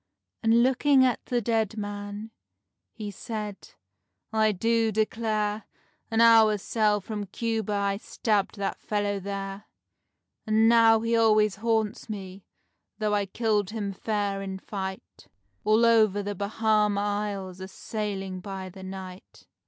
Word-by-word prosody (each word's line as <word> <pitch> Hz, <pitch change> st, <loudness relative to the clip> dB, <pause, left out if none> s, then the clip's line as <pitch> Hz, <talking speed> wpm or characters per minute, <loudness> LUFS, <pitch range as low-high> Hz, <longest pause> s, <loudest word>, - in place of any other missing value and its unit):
And 230 Hz, +1 st, +4 dB
looking 265 Hz, +1 st, +4 dB
at 250 Hz, -, 0 dB
the 245 Hz, -1 st, 0 dB
dead 220 Hz, -1 st, 0 dB
man, 205 Hz, +1 st, -6 dB, 0.6 s
he 210 Hz, -3 st, -6 dB
said: 210 Hz, -1 st, -7 dB, 0.6 s
"I 220 Hz, -1 st, +3 dB
do 225 Hz, +3 st, +1 dB
declare! 215 Hz, -1 st, -1 dB, 0.4 s
An 225 Hz, 0 st, +2 dB
hour's 220 Hz, -3 st, +6 dB
sail 210 Hz, -2 st, +1 dB
from 210 Hz, +1 st, -5 dB
Cuba 220 Hz, +1 st, -2 dB
I 200 Hz, -1 st, 0 dB
stabbed 210 Hz, -1 st, -1 dB
that 200 Hz, -1 st, -3 dB
fellow 205 Hz, -1 st, -1 dB
there. 195 Hz, +1 st, -5 dB, 0.8 s
And 220 Hz, +1 st, +4 dB
now 225 Hz, -1 st, +6 dB
he 230 Hz, +1 st, +1 dB
always 215 Hz, -3 st, +3 dB
haunts 220 Hz, 0 st, -1 dB
me, 195 Hz, -2 st, -7 dB, 0.5 s
though 210 Hz, -1 st, 0 dB
I 205 Hz, -1 st, +1 dB
killed 210 Hz, -2 st, 0 dB
him 210 Hz, -3 st, -3 dB
fair, 205 Hz, -1 st, -2 dB
in 190 Hz, -1 st, -5 dB
fight, 190 Hz, -, -7 dB, 0.4 s
All 220 Hz, +2 st, +4 dB
over 215 Hz, -3 st, +4 dB
the 205 Hz, +1 st, -3 dB
Bahama 210 Hz, +1 st, +1 dB
Isles 205 Hz, -2 st, -3 dB
a 190 Hz, -, -6 dB
sailing 195 Hz, -2 st, -4 dB
by 190 Hz, 0 st, -6 dB
the 190 Hz, +1 st, -12 dB
night." 190 Hz, -1 st, -9 dB
210 Hz, 135 wpm, -27 LUFS, 200-225 Hz, 0.8 s, hour's